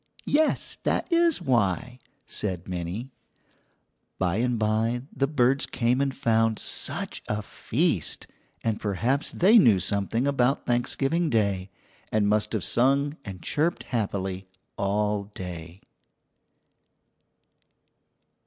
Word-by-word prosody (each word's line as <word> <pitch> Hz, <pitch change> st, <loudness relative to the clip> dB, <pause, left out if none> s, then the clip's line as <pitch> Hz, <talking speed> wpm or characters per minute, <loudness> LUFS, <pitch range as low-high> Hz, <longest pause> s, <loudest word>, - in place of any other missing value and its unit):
"Yes, 310 Hz, +1 st, +1 dB
that -, -, 0 dB
is 335 Hz, -2 st, +4 dB
why," 120 Hz, -, 0 dB, 0.3 s
said 90 Hz, -4 st, -3 dB
Minnie. 90 Hz, +8 st, -4 dB, 1.1 s
By 95 Hz, 0 st, 0 dB
and 125 Hz, +1 st, +1 dB
by 110 Hz, +3 st, 0 dB
the 135 Hz, +1 st, +1 dB
birds 135 Hz, -1 st, +2 dB
came 125 Hz, +2 st, +1 dB
and 140 Hz, -1 st, +1 dB
found 115 Hz, -4 st, +1 dB
such -, -, -4 dB
a 105 Hz, 0 st, -2 dB
feast, -, -, -1 dB, 0.4 s
and 110 Hz, -2 st, -1 dB
perhaps 115 Hz, -, 0 dB
they 210 Hz, +6 st, +5 dB
knew 115 Hz, -, +6 dB
something 100 Hz, +6 st, 0 dB
about 135 Hz, -1 st, +1 dB
Thanksgiving 135 Hz, +7 st, 0 dB
Day 100 Hz, -4 st, 0 dB, 0.4 s
and 105 Hz, -1 st, +2 dB
must 105 Hz, +1 st, +1 dB
have 105 Hz, -5 st, -1 dB
sung 140 Hz, +4 st, +2 dB
and 95 Hz, -4 st, -8 dB
chirped 160 Hz, +4 st, 0 dB
happily 95 Hz, -4 st, -2 dB, 0.3 s
all 105 Hz, +1 st, 0 dB
day. 90 Hz, -3 st, -8 dB
115 Hz, 110 wpm, -26 LUFS, 100-135 Hz, 1.1 s, knew